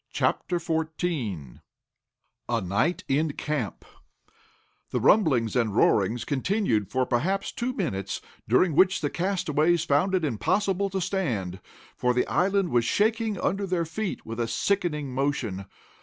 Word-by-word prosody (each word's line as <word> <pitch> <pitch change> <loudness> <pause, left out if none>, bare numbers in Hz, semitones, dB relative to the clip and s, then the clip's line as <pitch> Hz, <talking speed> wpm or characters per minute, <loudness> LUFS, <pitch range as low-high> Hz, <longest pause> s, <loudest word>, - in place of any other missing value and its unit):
CHAPTER 175 - 0
XIV 160 - -3 0.9
A 120 -1 +1
NIGHT 100 - 0
IN 145 +2 +1
CAMP 145 -10 -3 1.0
The - - -1
rumbling 145 - +4
and 115 -5 +1
roaring 110 +1 +3
continued 140 - 0
for 130 0 +1
perhaps 170 +12 0
two 245 +1 -2
minutes, 110 - -3 0.3
during 155 +8 +4
which 185 +5 +4
time - - -1
the 145 - -1
castaways 175 -3 +1
found 165 +6 +2
it 180 -4 +1
impossible 190 - 0
to 190 0 -2
stand, 125 - -2 0.4
for 125 0 +1
the 125 - +2
island 195 0 +1
was 120 -1 +3
shaking 215 - +1
under 195 +1 0
their 175 -2 0
feet 195 +5 -4
with 115 +1 -6
a 115 - 0
sickening 150 - -1
motion. 125 -8 -1
155 Hz, 140 wpm, -26 LUFS, 120-190 Hz, 1.0 s, rumbling